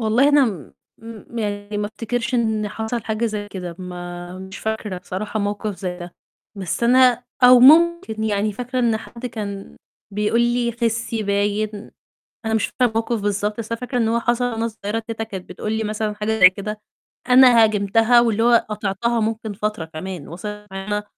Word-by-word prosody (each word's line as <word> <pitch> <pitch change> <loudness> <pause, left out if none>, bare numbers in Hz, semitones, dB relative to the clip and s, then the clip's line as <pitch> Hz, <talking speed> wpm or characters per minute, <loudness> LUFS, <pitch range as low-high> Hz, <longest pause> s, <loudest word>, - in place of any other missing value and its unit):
والله 230 +5 +3
أنا 290 -1 +5
م 190 - -4 0.7
م - - -3
يعني 205 -1 -3
ما 205 - -1
أفتكرش 235 +3 -3
إن 220 -3 0
حصل 220 +2 -4
حاجة 220 +1 -1
زي 210 -2 -4
كده، 180 -4 -7
ما 175 0 -7
مش 190 0 -9
فاكرة 220 -3 -3
بصراحة 205 +4 -4
موقف 205 0 -3
زي 180 -2 -5
ده، 175 -1 -9 0.4
بس 190 +1 -4
أنا 250 0 +4 0.2
أو 250 0 +8
ممكن 315 -5 +5
يعني 210 0 0
فاكرة 250 +4 -4
إن 235 -3 +2
حد 235 +2 -8
كان 200 -4 -6 0.4
بيقول 210 +3 +1
لي: 240 0 +1
"خِسّي" 230 -1 -1
باين، 205 +1 -1 0.6
أنا 220 - 0
مش 220 -1 +1
فاكرة 250 - +1
الموقِف 225 0 -1
بالضبط، 205 +1 -1
بس 230 0 -5
أنا 230 - -3
فاكرة 250 0 -3
إن 225 -2 +2
هو 230 +1 +1
حصل 240 +1 +1
وأنا 225 0 -1
صغيّرة 215 0 -4
كده 225 -1 -3
كانت 190 -4 -8
بتقول 195 +4 -4
لي 220 0 -1
مثلًا 215 0 -2
حاجة 215 +1 -2
زي 185 0 +9
كده، 210 +3 -6 0.5
أنا 250 -2 +7
هاجمتها 220 +3 +3
واللي 225 -2 +1
هو 235 0 +4
قاطعتها 210 +3 -1
ممكن 220 0 -2
فترة 210 -3 -3
كمان 160 0 -7
وصَلِت 210 +4 -7
إن - - -6
أنا 210 +2 -3
215 Hz, 180 wpm, -21 LUFS, 205-235 Hz, 0.7 s, زي